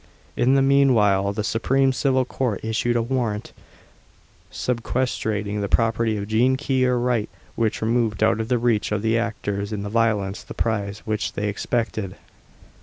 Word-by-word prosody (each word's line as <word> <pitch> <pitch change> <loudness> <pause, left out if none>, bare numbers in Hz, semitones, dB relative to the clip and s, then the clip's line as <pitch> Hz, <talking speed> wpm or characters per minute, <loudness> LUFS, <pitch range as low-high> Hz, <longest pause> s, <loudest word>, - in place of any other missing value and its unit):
In 130 +3 +3
the 135 - +4
meanwhile, 110 -8 +4
the 105 +1 -3
Supreme 130 +5 +1
Civil 130 -1 +1
Court 125 -5 -2
issued 115 +2 0
a 115 - +2
warrant, 115 -4 -2 1.0
sequestrating 110 -4 -2
the 100 - -2
property 115 -1 +1
of 100 0 -4
Jean 120 +5 +3
Key, 130 -2 +1
or 125 -1 +2
Wright, 120 -3 0 0.3
which 110 -1 -1
removed 115 -2 +1
out - - +3
of 110 - -2
the 125 0 +2
reach 115 -3 +1
of 105 0 -1
the 115 +1 +2
actors 105 -3 -3
in 105 -2 -3
the 100 - -4
violence 105 -4 0
the - - -10
prize 100 -3 -2
which 110 0 -2
they 105 - -2
expected. 110 -2 -2
115 Hz, 165 wpm, -23 LUFS, 105-125 Hz, 1.0 s, the